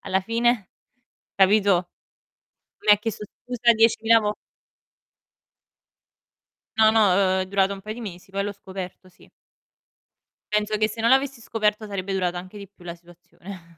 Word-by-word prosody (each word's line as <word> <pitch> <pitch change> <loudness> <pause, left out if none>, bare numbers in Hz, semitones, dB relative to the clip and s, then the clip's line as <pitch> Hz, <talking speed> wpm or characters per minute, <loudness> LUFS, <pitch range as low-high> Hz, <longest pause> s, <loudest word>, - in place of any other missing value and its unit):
alla 190 0 -1
fine 230 0 0 0.7
capito? 195 -2 +3 0.9
Mi 210 - +5
ha - - +6
chiesto 210 0 -5 0.2
scusa 245 -1 +2
10.000 225 0 +4
vo 210 0 -2 2.4
No, 220 0 +6
no, 225 - +4
uhm, 190 0 +2
è - - -6
durato 195 0 +1
un 195 - -11
pai 215 +2 -7
di 240 - -9
mesi, 190 -3 -9
poi 200 +1 -2
l'ho 205 - -3
scoperto, 190 -1 -9
sì. 175 - -22 1.2
Penso 210 0 0
che 215 0 +2
se 220 +1 -7
non 230 +2 +2
l'avessi 265 -2 +2
scoperto 215 -1 -1
sarebbe 195 -1 -4
durata 180 -2 -1
anche 185 +4 -8
di 200 - -9
più 190 -2 -23
la 170 0 -7
situazione 175 0 -14
200 Hz, 150 wpm, -23 LUFS, 185-220 Hz, 2.4 s, ha